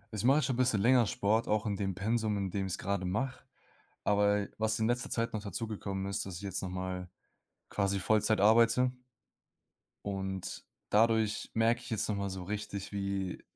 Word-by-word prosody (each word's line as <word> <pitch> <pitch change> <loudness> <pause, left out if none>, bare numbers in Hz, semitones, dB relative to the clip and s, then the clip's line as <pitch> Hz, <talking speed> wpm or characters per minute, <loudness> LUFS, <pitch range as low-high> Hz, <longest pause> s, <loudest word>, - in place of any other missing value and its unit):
Ich 105 - -2
mache 135 +3 +5
jetzt 155 - +2
schon 130 - 0
bisschen 125 -4 +3
länger 120 +2 +5
Sport, 110 +3 +1
auch 105 0 +1
in 105 -2 0
dem 95 -2 -2
Pensum, 110 +1 0
in 95 -2 -2
dem 95 0 -1
ich's 95 +1 -3
gerade 100 0 -2
mache. 110 +9 -2 0.6
Aber, 105 0 +3
was 110 0 +1
in 110 - +2
letzter 120 +1 -1
Zeit 115 0 -1
noch 110 - -2
dazugekommen 100 -2 -4
ist, 100 - -2
dass 95 - -6
ich 85 - -7
jetzt 95 -3 -3
noch 95 - -4
mal 90 0 -4 0.6
quasi 100 -1 0
Vollzeit 110 +2 +2
arbeite. 115 +4 +5 1.1
Und 95 -2 -4 0.2
dadurch 110 0 +2
merke 115 +2 +3
ich 125 - -10
jetzt 110 -2 -1
noch 105 - 0
mal 100 0 -2
so 95 -1 -5
richtig, 100 0 -5
wie, 100 -2 -3
105 Hz, 185 wpm, -32 LUFS, 95-115 Hz, 1.1 s, mache